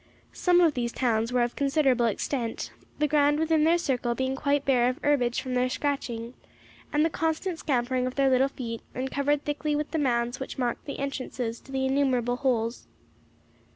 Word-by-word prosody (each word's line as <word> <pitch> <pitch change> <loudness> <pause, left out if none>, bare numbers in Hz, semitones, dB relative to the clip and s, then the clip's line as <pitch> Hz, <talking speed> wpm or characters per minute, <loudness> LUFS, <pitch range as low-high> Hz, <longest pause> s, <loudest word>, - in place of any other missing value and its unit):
Some 355 -1 +3
of 330 -3 +4
these 240 -2 -2
towns 230 -2 0
were 250 -1 +3
of 240 - -2
considerable 275 -4 +2
extent, 230 +2 -2 0.3
the 300 - +2
ground 295 0 +3
within 320 -1 +2
their 335 +2 +4
circle 250 -7 -1
being 260 +1 -1
quite 285 0 0
bare 250 -3 +3
of 255 - -3
herbage 250 -5 +2
from 255 - -4
their 250 0 +2
scratching, 250 -4 -3 0.6
and 300 +2 +3
the - - +2
constant 320 +2 -1
scampering 255 -2 0
of 255 - -5
their 275 -1 +3
little 260 +1 +4
feet, 230 -4 -6
and 260 +1 -3
covered 285 +1 0
thickly 295 0 -1
with 300 0 -2
the 320 - 0
mounds 240 -2 0
which 265 - -6
marked 245 -2 -2
the 280 - -5
entrances 255 -4 -4
to 270 - -15
the 265 0 0
innumerable 260 -3 +1
holes. 240 -3 -1
265 Hz, 190 wpm, -27 LUFS, 245-290 Hz, 0.6 s, of